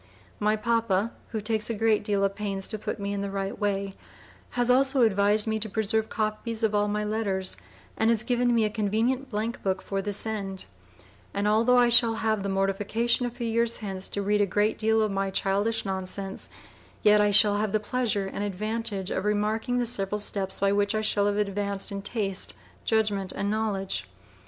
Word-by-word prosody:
My 210 +1 +2
Pappa, 230 -2 0 0.2
who 220 - -4
takes 215 +1 -1
a 230 - -1
great 220 0 +2
deal 205 -1 0
of 195 0 +1
pains 195 -2 -3
to 215 - -4
put 210 - -4
me 200 0 -3
in 200 - -2
the 200 - -3
right 195 0 -4
way, 200 -1 -1 0.6
has 245 -1 +2
also 265 +1 +4
advised 210 0 +4
me 220 -1 -1
to 215 +1 -2
Preserve 220 +1 0
Copies 220 +1 -2
of 215 -1 +2
all 205 0 +2
my 210 +1 -1
letters, 205 -3 0 0.4
and 220 - +2
has 230 -1 +2
given 245 0 +1
me 225 -2 +3
a - - 0
Convenient 225 +6 0
Blank 225 +1 -3
Book 190 -1 0
for 195 0 -3
this 205 +1 -2
end; 195 -3 -4 0.7
and 200 +1 0
altho' 230 +4 +4
I 245 -1 +5
shall 235 -1 +6
have 220 -2 0
the 200 - -3
mortification 205 +5 0
a - - -2
few 240 0 -6
years 230 +1 +1
hence 195 -3 -4
to 200 - -2
read 205 +1 +2
a 205 - +3
great 205 +3 +1
deal 220 0 +3
of 215 - 0
my 195 0 -1
Childish 200 +4 0
nonsense, 190 0 -5 0.5
yet 210 0 +6
I 205 - +3
shall 205 0 +6
have 210 -1 -1
the 215 - +2
Pleasure 215 -2 -1
and 195 +1 -4
advantage 205 0 -2
of 190 - -1
Remarking 215 +4 0
the 245 - +1
several 210 -3 -1
steps 195 -2 -3
by 200 0 +2
which 205 +1 +1
I 215 - +1
shall 205 -1 +1
have 205 0 0
advanced 200 -1 -1
in 200 0 -4
taste, 200 -2 -2 0.3
judgment 210 -4 +1
and 200 +1 -2
knowledge. 210 -3 -2
210 Hz, 200 wpm, -27 LUFS, 200-225 Hz, 0.7 s, shall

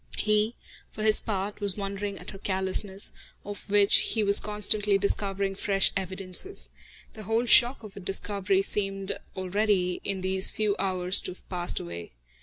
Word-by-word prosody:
He, 215 +2 +1 0.3
for 215 - -7
his 215 -1 +4
part, 205 0 -4
was 200 -1 -3
wondering 200 0 -4
at - - -10
her 195 - -11
callousness, 190 +1 -1 0.3
of 205 0 -9
which 205 0 +5
he 220 - +1
was 200 0 +4
constantly 210 -1 +1
discovering 195 0 0
fresh 195 0 +1
evidences. 190 - -4 0.4
The 220 - -10
whole 225 +3 0
shock 240 +1 +6
of 210 -2 -10
her - - -10
discovery 195 0 +1
seemed 195 -1 -1 0.3
already, 190 -1 0
in 195 -2 -3
these 190 0 +3
few 210 -2 -1
hours, 185 -1 +3
to - - -5
have - - -17
passed 175 -2 -1
away. 85 -3 -8
200 Hz, 160 wpm, -27 LUFS, 190-210 Hz, 0.4 s, shock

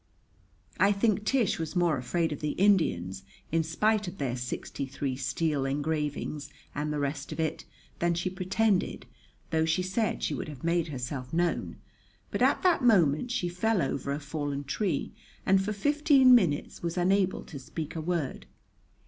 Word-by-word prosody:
I 200 - +5
think 210 0 +1
Tish 235 -7 +2
was 160 +1 -4
more 175 -3 +3
afraid 165 +6 -1
of 150 - -4
the 150 -1 -2
Indians, 100 - +2 0.3
in 165 +1 +3
spite 210 +6 +1
of 175 +2 -6
their 130 -4 -1
sixty 125 +2 -4
three 135 0 -3
steel 145 +2 -1
engravings 150 +1 -2 0.2
and 150 +1 -2
the 150 - -1
rest 140 0 -3
of - - -6
it, 160 -1 -2 0.3
than 170 0 +2
she 175 +2 -1
pretended, 190 +2 0 0.5
though 160 -1 +2
she 160 +3 +1
said 200 +4 -1
she - - 0
would - - -4
have 145 -4 -9
made 170 0 +1
herself 130 -2 -5
known, 175 +1 0 0.6
but - - -2
at - - +3
that 350 -7 +3
moment 185 - +4
she 240 -7 -1
fell 185 +5 +1
over 140 -2 -1
a 140 - -1
fallen 145 -1 -3
tree 145 +2 -1 0.3
and 195 0 +4
for 210 - -2
fifteen 275 +3 +5
minutes 175 -12 +2
was 170 +1 -3
unable 190 +1 +2
to 145 - -9
speak 155 +4 -6
a 160 - -2
word. 165 -4 -2
165 Hz, 170 wpm, -29 LUFS, 145-195 Hz, 0.6 s, I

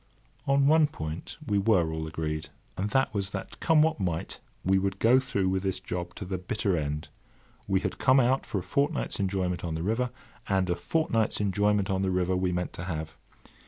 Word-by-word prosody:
On 140 0 +4
one 155 +1 +5
point 80 - -6
we 105 -5 +1
were 95 -6 +3
all 80 0 -3
agreed, 80 -1 -3 0.3
and 100 +3 -2
that 135 +1 +2
was 100 -2 -1
that, 95 -1 -7
come 160 -2 +5
what 160 -5 +1
might, 85 -4 -2 0.3
we 95 +1 +4
would 95 0 -1
go 120 +5 +5
through 115 -8 -1
with 95 0 0
this 95 -1 -1
job 90 -1 -5
to 100 - -6
the 95 0 -3
bitter 95 +1 -1
end. 75 -1 -3 0.6
We 95 -1 +2
had - - -3
come 130 0 +5
out 130 +1 +3
for - - -4
a 90 - -2
fortnight's 140 0 0
enjoyment 95 -3 -1
on 85 -2 -2
the 80 - -3
river, 115 +6 0 0.4
and 95 -2 +2
a - - +2
fortnight's 115 - 0
enjoyment 105 0 +1
on 95 0 0
the 95 - +1
river 90 0 +1
we 90 0 +1
meant 90 0 -2
to 85 - -6
have. 80 -3 -4
95 Hz, 205 wpm, -28 LUFS, 90-110 Hz, 0.6 s, one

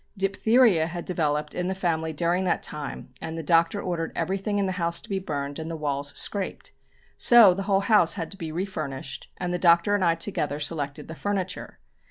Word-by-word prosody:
Diphtheria 195 -2 +3
had 170 0 -6
developed 150 -4 -1
in 180 0 -2
the 190 - -2
family 160 -4 -1
during 170 +4 0
that 180 - 0
time 145 -3 -7
and 160 0 -5
the 165 - -4
Doctor 165 +5 +3
ordered 170 -4 -3
everything 195 +5 -1
in 200 - +1
the 190 - -1
house 170 0 +1
to - - -12
be 195 -3 -2
burned, 145 -5 -4
and 160 +1 -5
the 165 - -4
walls 145 -2 -2
scraped. 200 -2 -2 0.5
So 230 -6 +7
the 195 - -4
whole 195 0 +3
house 205 -5 +4
had 165 -4 -5
to 195 - -10
be 165 -4 -5
refurnished, 155 -7 -5
and 180 -1 -3
the 180 - -1
Doctor 170 +3 +4
and 205 -2 +2
I 170 -2 +3
together 150 -5 -2
selected 145 -2 -3
the 160 - -7
furniture. 190 +1 -4
170 Hz, 205 wpm, -26 LUFS, 160-195 Hz, 0.5 s, So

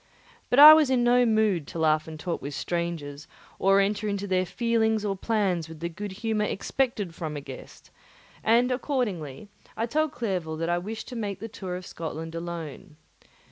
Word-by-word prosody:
But 245 - +2
I 300 +2 +12
was 310 -3 +4
in 255 -2 +2
no 245 0 +4
mood 215 -8 +2
to - - -8
laugh 155 -1 +2
and 160 -1 -8
talk 170 +2 -3
with 140 0 -6
strangers 160 -4 -4 0.3
or 195 +1 +4
enter 205 +2 0
into 200 -1 -2
their 185 -2 0
feelings 220 -1 +1
or 200 -1 -1
plans 190 -6 -1
with 160 -1 -10
the 170 +1 -3
good 205 +4 -6
humour 215 +1 -1
expected 210 -4 -2
from 155 -3 -5
a - - -3
guest; 135 -2 -12 0.5
and 240 +3 +3
accordingly 210 - -2 0.3
I 225 - 0
told 310 +5 0
Clerval 185 - -3
that 165 +1 -2
I 175 0 +1
wished 215 +5 -6
to 250 - -7
make 205 -4 -4
the 225 - -6
tour 190 -5 -6
of 180 0 -7
Scotland 160 -1 -6
alone. 165 -3 -7
195 Hz, 185 wpm, -26 LUFS, 165-225 Hz, 0.5 s, I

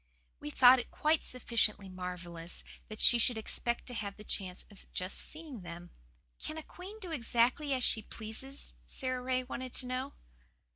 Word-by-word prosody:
We - - -5
thought 250 - +8
it 245 - -5
quite 310 +1 +2
sufficiently 230 -5 0
marvellous 180 -2 -5 0.2
that 215 - -8
she 240 - +7
should 235 0 +3
expect 235 +2 0
to 245 - -5
have 205 -4 -4
the 210 - -10
chance 185 -3 -3
of 200 - -13
just 185 +1 -2
seeing 305 -8 -7
them. 175 0 -8 0.5
"Can 310 - -5
a 315 - -5
queen 380 +7 -9
do 370 -5 -5
exactly 250 +1 +2
as 255 - -1
she 220 - +5
pleases?" 225 +6 -5
Sara 255 -2 -1
Ray 255 0 +1
wanted 255 0 -5
to 255 - +4
know. 255 +2 -2
240 Hz, 175 wpm, -33 LUFS, 200-260 Hz, 0.5 s, thought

